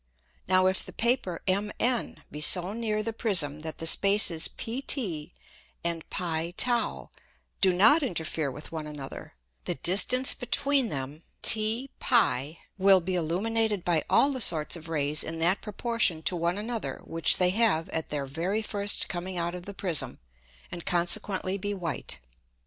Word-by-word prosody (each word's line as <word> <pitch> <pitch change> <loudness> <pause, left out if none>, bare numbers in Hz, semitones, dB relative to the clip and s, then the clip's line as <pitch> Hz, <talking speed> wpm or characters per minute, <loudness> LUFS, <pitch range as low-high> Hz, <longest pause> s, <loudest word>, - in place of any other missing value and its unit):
Now 185 0 +3
if 190 0 +1
the - - -10
Paper 235 -8 0
MN 210 +5 -1
be 150 - -8
so 180 +5 +3
near 215 -2 -2
the 225 +1 -4
Prism 175 -10 +1
that 160 0 -6
the 165 - -5
Spaces 195 -2 +4
PT 225 - -2 0.5
and 170 -1 -1
[Greek: 170 0 -3
pt] 240 -1 +1 0.5
do 190 - +5
not 220 - +5
interfere 160 - -2
with 150 +4 -9
one 160 -2 -6
another, 145 - -9 0.3
the - - 0
distance 205 - +4
between 270 0 +2
them 140 +1 -6 0.2
T[Greek: 225 +4 +4
p] 160 - +1 0.2
will 195 0 +5
be 185 +2 -4
illuminated 205 +4 -1
by 165 -3 +1
all 285 - +4
the 260 -2 -3
sorts 160 -6 +3
of 165 -1 -10
Rays 150 -1 -2
in 165 +1 -6
that 175 +4 +1
proportion 210 -6 -1
to 180 - 0
one 170 +2 -1
another 225 +2 -5
which 165 -3 0
they 180 -1 +3
have 195 -6 +1
at 160 - -4
their 145 -2 -3
very 175 +10 -3
first 205 -1 0
coming 180 0 -5
out 170 0 -2
of 180 0 -9
the 200 - -7
Prism, 175 -7 -2 0.5
and 175 -1 -7
consequently 185 +2 0
be 205 +1 -3
white. 165 - -3
185 Hz, 160 wpm, -27 LUFS, 165-215 Hz, 0.5 s, do